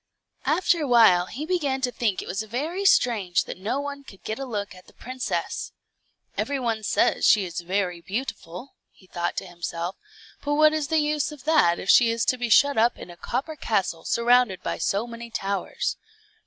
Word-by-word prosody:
After 350 -2 +2
a 295 - -1
while 220 -8 +5
he 290 +6 -6
began 300 -7 0
to 250 -1 0
think 215 -6 -1
it - - -12
was 195 +3 -2
very 295 - -3
strange 215 - +3
that - - -8
no 220 +8 -2
one 285 0 -6
could 195 -8 -15
get 220 +4 -4
a 270 - -4
look 205 -6 -4
at 185 0 -16
the - - -20
princess. 255 0 -4 0.6
"Every 280 -1 -1
one 230 -3 -1
says 215 - +2
she 205 -3 +5
is 175 0 -5
very 180 -1 -2
beautiful," 210 +1 -6 0.4
thought 175 0 -2
he - - -11
to - - -11
himself; 170 +1 -5 0.5
"but 290 0 0
what 310 +1 +5
is 310 -2 -1
the 320 - +1
use 300 -1 0
of 295 -4 -11
that 295 - +3
if - - -7
she 235 - +6
is 230 0 0
to 255 - +1
be 240 -1 -2
shut 280 +2 +5
up 235 +2 +3
in 175 - -10
a - - -12
copper 265 - -4
castle 195 - -1
surrounded 235 -4 +2
by - - -3
so 200 +4 0
many 235 0 -9
towers. 210 - -3
235 Hz, 200 wpm, -25 LUFS, 195-280 Hz, 0.6 s, she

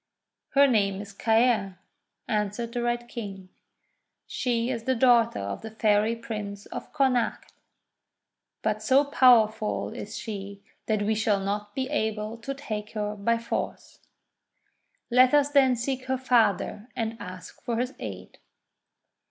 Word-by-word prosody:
'Her 280 +1 +7
name 200 -7 +2
is 200 0 -8
Caer," 220 -3 +2 0.5
answered 215 +2 -2
the 240 - -1
Red 240 0 -1
King. 195 -6 -7 0.8
"She 240 0 -1
is 230 -3 -4
the 260 - +2
daughter 235 -1 +4
of 100 0 -4
the 220 - -7
Fairy 215 0 +2
Prince 210 -3 -6
of - - -8
Connacht. 260 -5 0 1.1
But 215 -1 0
so 265 +6 +4
powerful 230 -6 +3
is 210 - -7
she 200 -2 -7 0.2
that 215 -2 +1
we 215 +2 +1
shall 210 -2 +1
not 205 +1 -3
be 260 -1 -1
able 220 -5 -2
to 275 +4 -5
take 215 -6 -5
her 210 -1 -2
by 230 +3 +1
force. 230 0 -5 1.1
Let 255 +3 +6
us 290 0 +3
then 265 -3 +5
seek 255 +2 -3
her 260 0 0
father 225 -3 +1
and 225 -1 -2
ask 185 -2 -9
for 235 -1 -2
his 250 +2 -1
aid." - - -8
225 Hz, 140 wpm, -27 LUFS, 210-245 Hz, 1.1 s, Her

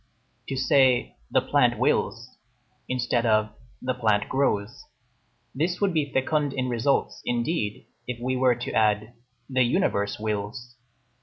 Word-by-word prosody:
To 135 - -2
say: 130 -1 +3
"the - - +3
plant - - +2
wills," - - 0 0.5
instead 125 -1 0
of: 110 -2 +2 0.3
"the 130 0 0
plant 110 -4 +1
grows": 120 -5 -1 0.7
this 165 +6 -1
would 200 -3 +1
be 150 -3 0
fecund 145 +1 0
in 130 -1 -2
results, 115 -3 0
indeed, 120 -3 -2 0.2
if 125 -1 -4
we 130 +2 -1
were 125 -1 +3
to 120 - -5
add: 105 +1 +1 0.3
"the 130 -1 +1
universe 120 - +1
wills." 110 +3 -4
125 Hz, 135 wpm, -25 LUFS, 110-135 Hz, 0.7 s, say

